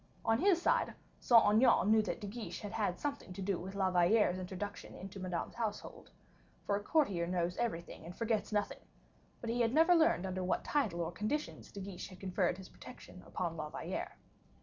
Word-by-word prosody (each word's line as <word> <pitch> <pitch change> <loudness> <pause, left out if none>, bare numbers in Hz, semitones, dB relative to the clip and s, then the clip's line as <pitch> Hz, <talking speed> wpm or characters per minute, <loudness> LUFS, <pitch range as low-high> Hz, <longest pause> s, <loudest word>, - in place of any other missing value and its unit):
On 225 +1 +3
his 365 +1 +4
side, - - +1 0.2
Saint 235 -2 +6
Aignan 215 -1 +5
knew 220 0 +6
that 215 - -3
De 210 - -6
Guiche 215 +2 -6
had 205 - -6
had 205 -5 -1
something 280 -10 -4
to 195 - -7
do 190 -2 0
with 190 +2 -7
La 190 -1 +1
Valliere's 180 +1 +3
introduction 190 +1 -6
to 195 0 -9
Madame's 180 -2 -3
household, 220 -3 -5 0.6
for 200 - +1
a 205 - -2
courtier 205 - +1
knows 175 0 0
everything 170 -10 -3
and 170 +2 -9
forgets 220 -3 0
nothing; 205 -1 -1 0.6
but 230 - -2
he 240 +1 0
had 230 +3 +2
never 330 +3 +6
learned 315 - +4
under 185 0 -2
what 180 - 0
title 215 -13 0
or 165 0 -2
conditions 215 - -3
De 200 - -8
Guiche 190 -2 -6
had 185 -1 -13
conferred 185 -2 0
his 190 -1 -10
protection 180 - -12
upon 170 -2 -3
La 155 -1 -4
Valliere. - - -5
200 Hz, 195 wpm, -34 LUFS, 180-230 Hz, 0.6 s, Saint